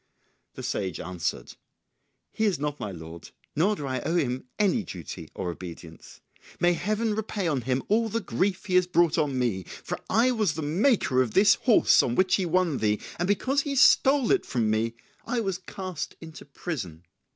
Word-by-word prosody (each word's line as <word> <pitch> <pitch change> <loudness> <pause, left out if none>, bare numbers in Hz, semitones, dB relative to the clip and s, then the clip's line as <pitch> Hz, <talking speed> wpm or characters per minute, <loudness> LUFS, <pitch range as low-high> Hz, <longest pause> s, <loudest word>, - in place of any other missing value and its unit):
The - - -7
sage 95 -5 -3
answered, 90 -2 -4 0.8
"He 220 - -1
is 200 -4 +2
not 150 +1 -3
my 105 - -4
lord, 80 -1 -10 0.3
nor 195 +8 +2
do 145 - -6
I 130 -2 -2
owe 165 - -1
him 130 -7 -1
any 210 +2 +2
duty 85 - -8
or 90 -2 -3
obedience. 85 -2 -11 0.4
May 175 0 +4
Heaven 215 +5 -1
repay 210 -3 -2
on 145 -5 0
him 130 +2 -1
all 225 +2 +2
the 230 - -1
grief 195 -1 -1
he 185 - -4
has 180 0 +4
brought 170 -2 +3
on 145 -4 0
me, 115 -7 0 0.2
for - - -4
I 235 +4 +3
was 215 -9 0
the 160 - -4
maker 155 - +2
of 125 -4 -2
this 200 +2 +7
horse 240 -4 +4
on 120 - -1
which 185 +3 +2
he 185 -3 +2
won 170 -4 +1
thee, 105 -1 +1 0.2
and 175 - 0
because 255 +8 +1
he 280 -1 -3
stole 270 0 +5
it 395 - +3
from 115 -4 0
me 115 +1 0 0.3
I 245 - 0
was 195 -4 -2
cast 185 -3 -6
into 160 -1 -11
prison. 110 - -6
170 Hz, 190 wpm, -26 LUFS, -, 0.8 s, this